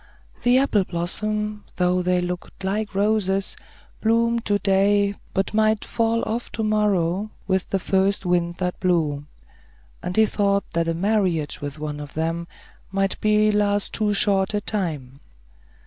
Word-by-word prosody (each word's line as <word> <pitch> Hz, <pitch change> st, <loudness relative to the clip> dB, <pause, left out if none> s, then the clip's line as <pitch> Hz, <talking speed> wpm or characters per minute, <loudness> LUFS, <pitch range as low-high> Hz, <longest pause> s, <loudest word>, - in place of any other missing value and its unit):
The 245 Hz, +1 st, +4 dB
apple 260 Hz, -7 st, +3 dB
blossoms, 210 Hz, +5 st, -2 dB
though 180 Hz, 0 st, +2 dB
they 180 Hz, 0 st, +1 dB
looked 180 Hz, +2 st, -6 dB
like 205 Hz, +2 st, -2 dB
roses, 200 Hz, -1 st, +1 dB, 0.5 s
bloomed 230 Hz, +1 st, +2 dB
to 205 Hz, 0 st, +2 dB
day, 200 Hz, 0 st, +2 dB, 0.2 s
but 195 Hz, +2 st, 0 dB
might 215 Hz, 0 st, +2 dB
fall 230 Hz, -1 st, 0 dB
off 235 Hz, +2 st, -3 dB
to 225 Hz, -, -2 dB
morrow, 205 Hz, -2 st, +1 dB, 0.2 s
with 190 Hz, -1 st, 0 dB
the 195 Hz, -, +1 dB
first 195 Hz, +1 st, +1 dB
wind 175 Hz, -1 st, +1 dB
that 180 Hz, 0 st, -3 dB
blew; 155 Hz, -6 st, 0 dB, 0.7 s
and 180 Hz, -, -4 dB
he 220 Hz, -, +6 dB
thought 200 Hz, -1 st, +1 dB
that 165 Hz, 0 st, 0 dB
a 165 Hz, -, 0 dB
marriage 185 Hz, -5 st, 0 dB
with 145 Hz, 0 st, -5 dB
one 150 Hz, -1 st, -5 dB
of 145 Hz, -1 st, -9 dB
them 165 Hz, +2 st, -2 dB, 0.4 s
might 195 Hz, 0 st, -1 dB
last 210 Hz, -1 st, +2 dB
too 215 Hz, -1 st, +1 dB
short 200 Hz, -1 st, +3 dB
a 205 Hz, -, 0 dB
time. 155 Hz, -11 st, -3 dB
195 Hz, 150 wpm, -23 LUFS, 175-210 Hz, 0.7 s, he